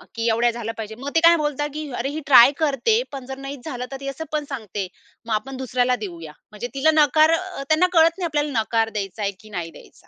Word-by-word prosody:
की 230 0 -1
एवढ्या 235 +2 +3
झालं 230 -1 -5
पाहिजे. 220 -1 -6
मग 275 - -4
ते - - +6
काय 340 0 +8
बोलतात, 295 -1 -1
की 305 -1 -5
"अरे, 265 - -2
ही 300 +2 -4
ट्राय 255 -2 +8
करते 315 - +2
पण 270 -2 -7
जर 265 +1 -7
नाही 275 +1 -7
झालं 250 -5 -4
तर 270 - -5
ती 275 - -7
असं 275 +4 -5
पण 305 -1 -1
सांगते, 210 -7 -5 0.4
मग 230 - -2
आपण 260 +5 -3
दुसऱ्याला 250 -1 +1
देऊया." 170 -6 -7 0.2
म्हणजे 215 +3 -6
तिला 275 +4 +3
नकार 310 +1 +5
अ, 365 -3 -2
त्यांना 315 +4 +4
कळत 330 +1 +5
नाही, 360 - -2
आपल्याला 295 -6 0
नकार 225 0 0
द्यायचा 205 -1 -5
आहे 200 -1 0
की 215 - -16
नाही 170 -5 -5
द्यायचा. - - -17
265 Hz, 240 wpm, -22 LUFS, 225-300 Hz, 0.4 s, काय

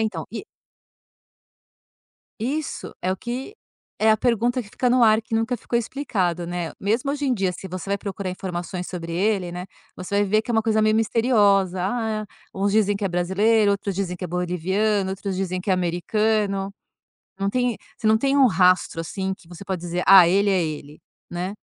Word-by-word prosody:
então 220 0 -2
e 235 - -6 2.0
Isso 285 +6 -3
é 185 - -1
o 190 - -1
que 250 - -5 0.4
é 220 0 +4
a 215 - +5
pergunta 240 +2 +1
que 200 - -15
fica 250 +4 0
no 250 0 +4
ar 220 0 +5
que 225 - -5
nunca 225 +2 0
ficou 235 - -1
explicado, 185 - -2
né. 175 -1 -3
Mesmo 230 +8 0
hoje 290 0 -2
em 265 - +2
dia, 195 -6 0
se 180 +2 -8
você 185 +1 -6
vai 200 - +1
procurar 200 -1 -5
informações 180 -1 -5
sobre 170 -2 -6
ele, 190 0 0
né, 180 +1 -6 0.3
você 185 +2 -3
vai 205 - +3
ver 215 +2 +2
que 230 - -7
é - - +1
uma 220 -1 +2
coisa 220 -1 +2
meio 215 0 +3
misteriosa. 205 -5 +3
Ah, 215 +1 -2 0.3
uns 200 +1 0
dizem 205 -1 +3
que 200 - -3
é - - -1
brasileiro, 200 +5 +2
outros 200 -1 -1
dizem 190 -2 -2
que 180 - -11
é - - -1
boliviano, 185 +4 0
outros 195 0 -4
dizem 185 -1 -2
que 195 - -2
é - - +5
americano. 195 +3 0 0.7
Não 195 0 0
tem 245 -2 0 0.2
você 220 - -3
não 220 0 +5
tem 275 +4 +1
um 275 - +6
rastro, 185 -4 +3
assim, 190 +3 -3
que 180 - -22
você 175 +2 -11
pode 185 -2 -4
dizer: 175 +1 -2
"Ah, 190 -2 +9
ele 200 +4 +3
é 185 -3 +2
ele", 150 -1 -7 0.3
né. 180 +3 -3
200 Hz, 200 wpm, -23 LUFS, 180-220 Hz, 2.0 s, Ah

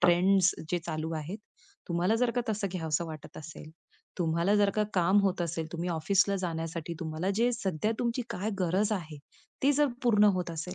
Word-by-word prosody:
Trends 180 +2 +4 0.2
जे 175 - +1
चालू 160 0 -3
आहेत 160 +7 -5 0.5
तुम्हाला 175 +4 +2
जर 245 0 +2
का 245 - +3
तसं, 210 -2 0
घ्यावसं 165 -2 -1
वाटत 155 -2 -9
असेल 155 0 -9 0.5
तुम्हाला 170 +3 +2
जर 205 -1 +4
का 210 +2 0
काम 185 +2 +4
होत 190 -2 +1
असेल 165 -1 -3
तुम्ही 170 +1 -3
ऑफिसला 195 +5 +2
जाण्यासाठी 165 -1 -3
तुम्हाला 160 +3 -2
जे 235 +2 +3
सध्या 200 -2 -1
तुमची 240 +1 0
काय 210 +1 -2
गरज 190 +4 +1
आहे. 160 -7 -4 0.4
ती 280 - +5
जर 295 +1 +3 0.2
पूर्ण 210 -4 +5
होत 180 -1 -2
असेल 165 +3 -5
180 Hz, 180 wpm, -29 LUFS, 165-205 Hz, 0.5 s, ती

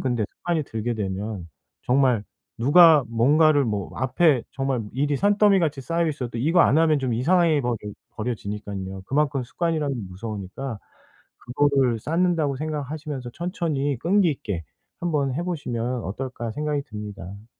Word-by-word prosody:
근데 120 -5 0
습관이 170 -3 -2
들게 115 -1 -3
되면 100 -2 -4 0.3
정말 125 -4 +2 0.3
누가 155 +3 +7
뭔가를 145 +5 +4
뭐 105 -4 -2
앞에 135 0 +3
정말 135 -3 -1
일이 145 +3 0
산더미같이 200 -6 +3
쌓여 165 +4 0
있어도 125 -6 -4
이거 165 +8 +3
안 145 - +5
하면 155 -2 +4
좀 130 -3 -1
이상해 160 +4 +3
버리 120 -1 0 0.4
버려지니깐요. 100 -4 -5
그만큼 140 -1 +1
습관이란 155 -1 -1 0.2
무서우니까 105 +4 -6 0.8
'그거를 135 -5 +3
쌓는다.' 165 +2 +1
고 135 - -3
생각하시면서 150 -3 -4
천천히 155 - -2
끈기 180 +2 +3
있게 100 - -4 0.4
한번 145 -6 0
해 170 - -2
보시면 125 -8 -3
어떨까 120 +2 -5
생각이 150 +1 -2
듭니다. 105 -2 -8
135 Hz, 330 characters per minute, -24 LUFS, 115-155 Hz, 0.8 s, 누가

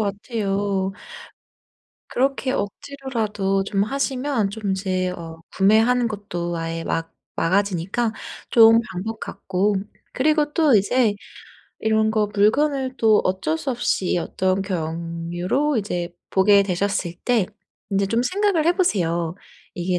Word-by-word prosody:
같아요. 200 -2 -1 1.2
그렇게 270 0 0
억지로라도 215 -5 -2
좀 195 0 0
하시면 265 -2 -1
좀 205 -2 -3
이제 185 -1 -1
어 165 -2 -8 0.2
구매하는 225 +5 +4
것도 175 -5 -4
아예 165 0 -3
막 165 0 -3 0.2
막아지니까 195 +5 0 0.4
좋은 225 -1 +7
방법 215 +5 -5
같고 195 +2 -1 0.4
그리고 300 +2 +2
또 310 -7 +4
이제 215 +2 +2 0.7
이런 220 0 +2
거 215 -1 +1
물건을 265 +5 +2
또 220 -3 +4
어쩔 185 -4 0
수 265 - -3
없이 235 -7 0
어떤 185 +3 0
경유로 175 - -2
이제 180 -5 -2 0.2
보게 200 +1 +5
되셨을 190 -2 -1
때 235 -6 +2 0.4
인제 195 0 +1
좀 230 +4 +1
생각을 370 +2 +1
해 340 - +5
보세요. 175 - 0 0.4
'이게 180 0 -1
205 Hz, 245 characters per minute, -22 LUFS, 185-240 Hz, 1.2 s, 좋은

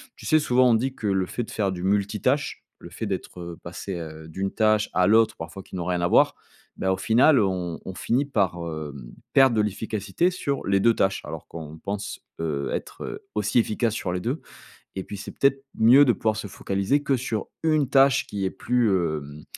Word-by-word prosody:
tu - - -13
sais 155 - +5
souvent 125 -3 +4
on - - +5
dit 130 +4 0
que 110 - -4
le 95 -2 +1
fait 120 +6 -4
de - - -10
faire 100 -3 0
du 90 -1 -5
multitâche, 105 +8 0
le - - -11
fait - - -4
d'être, - - -5
heu, 85 -1 -7
passé, 90 +2 -6
heu, 80 -1 -8
d'une 95 +4 -3
tâche 110 -1 +2
à 90 0 +3
l'autre 110 +1 +4
parfois 85 +4 -8
qui - - -11
n'ont 90 -2 -3
rien 90 0 0
à 85 - +2
voir, - - +4 0.4
bah, 95 - 0
au - - -2
final 125 +8 +4
on 90 -4 -1
on 95 - -7
finit 125 +9 0
par, 100 -10 0
hem, 75 -7 -6 0.2
perdre 135 -3 +6
de - - +4
l'efficacité 105 - -1
sur 140 -6 -3
les 100 0 +3
2 115 +3 +4
tâches. 95 -2 +1
Alors - - -7
qu'on 80 -1 -9
pense, 100 +3 -5 0.2
heu, 75 -4 -2
être, - - -5
heu, - - -7
aussi 105 +1 0
efficace 115 -1 +1
sur 90 - -2
les 90 - -2
2 130 - -2 0.6
et 95 - -2
puis, 100 - -8
c'est 100 - -7
peut-être 135 0 +3 0.2
mieux 125 +6 +7
de 120 - +4
pouvoir 110 -1 0
se 110 - -5
focaliser 100 +9 -1
que 135 -2 +1
sur 115 -4 -3 0.2
1 155 -4 +2
tâche 135 -1 +4
qui 100 -2 -3
est 95 - +1
plus, 120 +3 +1
hem, 75 -5 -2
100 Hz, 220 wpm, -25 LUFS, 90-120 Hz, 0.6 s, mieux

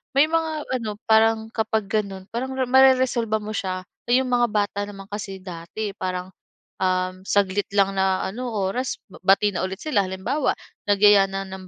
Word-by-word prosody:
may 280 +3 +6
mga 320 -1 -1
ano 220 -4 -3
parang 220 0 +4
kapag 220 -2 0
ganon, 200 -2 -3
parang 255 +3 -3 0.2
mareresolba 255 -4 +4
mo 210 0 -6
siya. 185 -2 -3 0.2
So, - - -1
yung 260 0 +2
mga 240 -1 +3
bata 205 -1 0
naman 195 -1 -10
kasi 195 -2 -5
dati 185 +4 -5
parang, 185 -1 -4 0.5
um, 185 0 0
saglit 200 0 +1
lang 195 -1 +4
na 190 0 +1
ano, 245 +6 -4
oras, 210 +6 -2 0.2
bati 200 +2 +4
na 185 - -3
ulit 190 +2 -7
sila, 245 -11 +2
halimbawa, 215 +10 -1 0.4
nagyaya 205 -1 +6
na 195 0 -4
ng 190 -1 -9
205 Hz, 165 wpm, -23 LUFS, 190-235 Hz, 0.5 s, may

